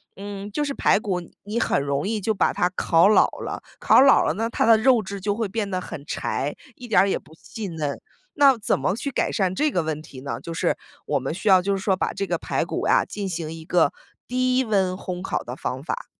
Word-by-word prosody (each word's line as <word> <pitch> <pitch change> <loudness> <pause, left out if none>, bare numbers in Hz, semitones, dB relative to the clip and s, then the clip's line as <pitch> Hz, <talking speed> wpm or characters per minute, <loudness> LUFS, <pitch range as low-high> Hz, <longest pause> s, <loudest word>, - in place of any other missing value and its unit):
嗯， 200 0 -7
就 295 - -1
是 280 - -2
排 205 - +3
骨 185 -4 -2 0.2
你 215 +3 -2
很 - - +1
容 140 +4 -1
易 220 -1 -1
就 220 +3 0
把 195 - +2
它 180 - +2
烤 165 +1 +4
老 215 - +5 0.2
了， - - -5 0.2
烤 - - +6
老 270 0 +6
了 - - +1
呢， 225 +5 -2
它 - - 0
的 225 - +7
肉 240 -1 +4
质 195 0 -6
就 205 +1 0
会 225 -2 -1
变 205 0 -3
得 185 - -1
很 150 -5 -8
柴， 140 +3 -2 0.2
一 245 - -10
点 205 -5 +5
儿 195 - +3
也 - - 0
不 160 - -19
细 215 +4 -7
嫩。 155 -5 -4 0.3
那 275 -4 +5
怎 205 - 0
么 150 +9 0
去 275 +3 -4
改 - - 0
善 190 -3 0
这 300 +9 +1
个 175 - 0
问 155 -1 -3
题 135 -4 -12
呢？ 140 - -4
就 165 - -6
是 - - 0 0.3
我 145 -2 0
们 135 +4 -3
需 205 +4 -1
要 185 -1 +7
就 200 +1 0
是 190 - -7
说 190 -2 +2
把 - - -1
这 200 - -2
个 - - -1
排 - - -1
骨 - - -3
呀 - - +4
进 205 -2 -5
行 165 -3 -4
一 160 -1 -9
个 175 +1 +3 0.4
低 255 +1 +1
温 195 -5 +1
烘 180 -1 -5
烤 - - -2
的 120 - -6
方 130 +2 -4
法。 - - -4
195 Hz, 270 characters per minute, -24 LUFS, 165-220 Hz, 0.4 s, 的